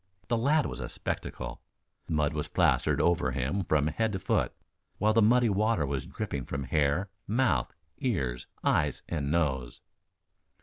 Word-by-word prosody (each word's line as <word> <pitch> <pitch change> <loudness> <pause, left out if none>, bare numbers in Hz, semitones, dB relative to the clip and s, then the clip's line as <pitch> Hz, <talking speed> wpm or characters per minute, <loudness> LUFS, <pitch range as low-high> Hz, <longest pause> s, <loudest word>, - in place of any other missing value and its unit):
The 120 - +3
lad 145 +6 +3
was - - -4
a - - -4
spectacle. - - -5 0.5
Mud 75 -2 +1
was 75 -1 -2
plastered - - +2
over 85 0 +2
him 95 +11 -1
from 75 -3 +2
head 105 +8 0
to - - 0
foot, 95 - 0 0.5
while 110 +1 +3
the 115 - +5
muddy 120 +3 +5
water 105 -5 +2
was 70 -1 -3
dripping 65 -3 -4
from 70 -1 -3
hair, 75 +7 +1 0.2
mouth, 120 +4 +1 0.3
ears, 65 - -1 0.2
eyes - - +1
and 75 -4 -2
nose. 70 -7 0
85 Hz, 150 wpm, -29 LUFS, 70-110 Hz, 0.5 s, the